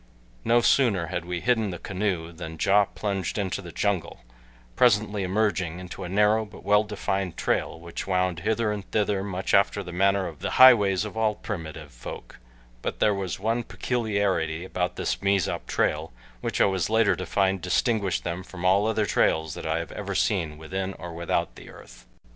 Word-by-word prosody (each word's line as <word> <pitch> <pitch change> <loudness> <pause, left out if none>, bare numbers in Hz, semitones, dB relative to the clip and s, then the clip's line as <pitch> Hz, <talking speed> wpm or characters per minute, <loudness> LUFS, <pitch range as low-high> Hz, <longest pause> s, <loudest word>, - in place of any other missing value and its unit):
No 120 +1 +4
sooner 115 -9 +3
had 90 - -2
we 90 -1 -3
hidden 115 -4 +2
the 90 - -5
canoe 90 -3 -2
than 80 -1 -8
Ja 100 +1 +4
plunged 95 -3 -3
into 100 -1 -2
the 85 -2 -9
jungle, 95 -11 -2 0.5
presently 105 -3 +3
emerging 95 -3 0
into 90 +1 -8
a 90 - -5
narrow 105 +3 +3
but 105 - -13
well 105 +1 +4
defined 100 -3 -3
trail - - -1
which 85 +2 -7
wound 90 -2 0
hither 110 +2 0
and 100 -2 -5
thither 105 -2 0
much 95 -1 -3
after 100 +1 +3
the 90 - -8
manner 95 +2 +2
of 80 -4 -7
the - - -3
highways 105 -7 +7
of 105 - -7
all 110 -1 +1
primitive 80 - -7
folk, - - -9 0.4
but - - -4
there 105 - +4
was 95 -3 -3
one 115 +4 0
peculiarity 100 -10 -1
about 90 -1 -2
this - - -2
Mezop 100 -2 0
trail - - 0 0.3
which - - -3
I - - +6
was 95 -2 0
later 110 -1 +3
to 95 - -4
find 95 -2 +1
distinguished 100 +2 0
them 85 +1 -3
from 95 -1 -8
all 100 +3 +4
other 110 -1 +1
trails 80 -3 +1
that - - -6
I 80 +1 0
ever 85 - -8 0.2
have - - 0
seen 85 -8 0
within 95 +5 -4
or 85 -1 -8
without 85 +1 -1
the - - -12
earth. - - -15
95 Hz, 185 wpm, -26 LUFS, 90-105 Hz, 0.5 s, highways